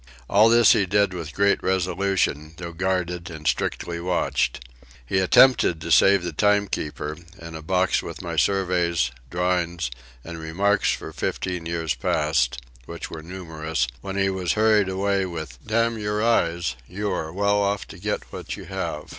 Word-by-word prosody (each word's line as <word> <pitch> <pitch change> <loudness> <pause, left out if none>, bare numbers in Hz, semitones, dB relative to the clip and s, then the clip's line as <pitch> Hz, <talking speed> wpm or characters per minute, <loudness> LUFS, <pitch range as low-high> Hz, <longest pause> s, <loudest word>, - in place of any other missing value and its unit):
All 105 +3 +5
this 115 -1 +6
he 100 - +3
did 100 0 +2
with 85 -4 -6
great 100 +5 +2
resolution, 90 -4 0
though 85 -1 -6
guarded 90 -1 -2
and 80 -2 -9
strictly 85 +2 -1
watched. 85 -8 -1 0.4
He 95 +10 +1
attempted 95 -2 +5
to 85 +1 -5
save 95 +4 +5
the 85 -2 -4
timekeeper, 95 -6 0 0.2
and 80 -2 -9
a 80 - -7
box 95 +3 +1
with - - -8
my 85 -2 -5
surveys, 85 -4 +1 0.2
drawings, 85 -5 -1 0.3
and 85 -1 -8
remarks 100 +6 +1
for - - -5
fifteen 90 -3 -3
years 85 -2 -1
past, - - 0 0.3
which - - -7
were 80 - -7
numerous, 80 -5 -3 0.2
when 95 0 -5
he 95 0 +2
was 95 -2 -1
hurried 105 -2 +3
away, 95 0 0
with 80 -8 -7
"Damn 115 +1 0
your 105 0 -1
eyes 85 - +1
you 100 +2 -3
are 80 -3 -3
well 100 +3 +1
off 100 0 -1
to - - -11
get - - -2
what - - -6
you - - -9
have." 75 - -4
90 Hz, 165 wpm, -24 LUFS, 80-100 Hz, 0.4 s, this